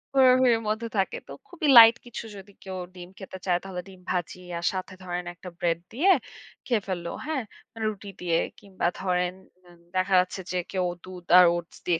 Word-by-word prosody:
হুড়াহুড়ির 255 -3 +5
মধ্যে 220 +2 -1
থাকে। 190 -1 0
তো - - -11 0.2
খুবই 325 -4 -3
লাইট 230 0 +11
কিছু 240 -1 -7
যদি 195 +1 -12
কেউ 190 -1 -6 0.2
ডিম 175 0 -10
খেতে 190 -1 -8
চায়, 175 -1 +2
তাহলে 185 -2 -5
ডিম 190 -1 -13
ভাজি 180 0 -3 0.2
আর 170 - -4
সাথে 185 0 -5
ধরেন 180 0 -4
একটা 180 +1 -10
ব্রেড 170 -1 +1
দিয়ে 335 +11 +2 0.6
খেয়ে 235 -5 +1
ফেললো। 175 -2 -3 0.2
হ্যাঁ? 300 -5 -2 0.4
রুটি 210 -2 -3
দিয়ে 170 -2 +1 0.2
কিংবা, 195 -3 -5
ধরেন 180 -1 0 0.3
ইন 175 -1 -18 0.2
দেখা 185 +1 +1
যাচ্ছে 185 +1 -1
যে 180 - -1
কেউ 185 -2 0 0.2
দুধ 180 -1 -10
আর 180 - +9
ওটস 170 -1 -7
দিয়ে 170 -2 +2
185 Hz, 185 wpm, -26 LUFS, 180-215 Hz, 0.6 s, লাইট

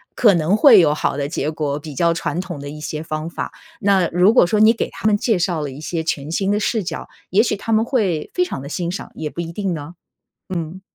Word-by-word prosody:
可 215 -6 +5
能 170 +5 +2
会 - - +8
有 150 -3 +4
好 150 - -1
的 140 0 -2
结 150 -1 -2
果， 150 -2 -2
比 150 -1 -9
较 170 +3 +3
传 165 +1 -2
统 175 -6 -7
的 145 0 -7
一 150 +1 -9
些 155 0 -4
方 155 0 -4
法， - - -5 0.3
那 195 -3 +3
如 180 +6 +4
果 245 - +6
说 210 +3 +1
你 220 +2 +7
给 - - -3
他 - - -10
们 210 - +4
介 210 -1 +1
绍 175 -3 0
了 145 - -3
一 135 - -10
些 160 +1 -3
全 150 -2 -3
新 195 +3 0
的 210 - +1
视 215 -1 0
角， - - -5 0.2
也 200 - +4
许 215 - 0
他 225 +3 -5
们 220 +1 +3
会 195 - 0
非 360 - +2
常 355 - -5
地 140 - -8
欣 170 +3 -3
赏 190 - -6
也 155 -1 -4
不 - - -10
一 165 -1 -5
定 195 -1 -2
呢。 150 +2 -7 0.6
嗯。 170 +2 -4
170 Hz, 280 characters per minute, -20 LUFS, 155-205 Hz, 0.6 s, 会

